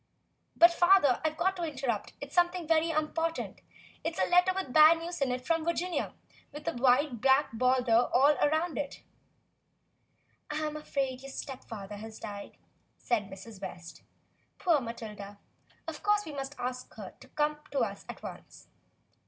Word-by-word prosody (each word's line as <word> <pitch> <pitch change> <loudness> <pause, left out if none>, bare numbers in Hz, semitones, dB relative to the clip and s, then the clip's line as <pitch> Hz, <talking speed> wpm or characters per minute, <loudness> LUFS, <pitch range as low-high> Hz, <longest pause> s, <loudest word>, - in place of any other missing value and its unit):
"But, 340 +1 +7
father, 350 -7 +5
I've 315 0 -1
got 380 +2 +1
to 350 - -3
interrupt; 265 -8 -3
it's 285 0 -8
something 350 -1 +2
very 325 0 +3
important; 325 +1 -2 0.4
it's - - -3
a - - +2
letter 360 +1 +5
with 370 -9 -4
bad 310 +2 +8
news 340 0 -6
in 270 -2 +2
it 250 0 -3
from 330 -1 +1
Virginia 340 +2 -2 0.4
with 295 +1 -10
a - - +1
wide 250 0 +2
black 265 +2 +4
border 245 0 +3
all 280 +4 +5
round 315 +2 0
it." 285 -1 -5 1.5
"I'm 305 0 -2
afraid 270 -4 -2
your 275 - -9
stepfather 225 -8 -7
has 220 +1 -9
died," 205 -2 -8 0.4
said 215 -5 -1
Mrs. 195 +1 -11
West. 170 -3 -8 0.6
"Poor 330 -6 +2
Matilda. 210 -4 -7 0.5
Of 315 -2 -6
course 415 0 +2
we 310 - -6
must 275 0 -5
ask 250 0 -4
her - - -8
to - - -15
come 300 0 -1
to 275 - 0
us - - -2
at - - -8
once." - - -10
285 Hz, 160 wpm, -30 LUFS, 245-330 Hz, 1.5 s, bad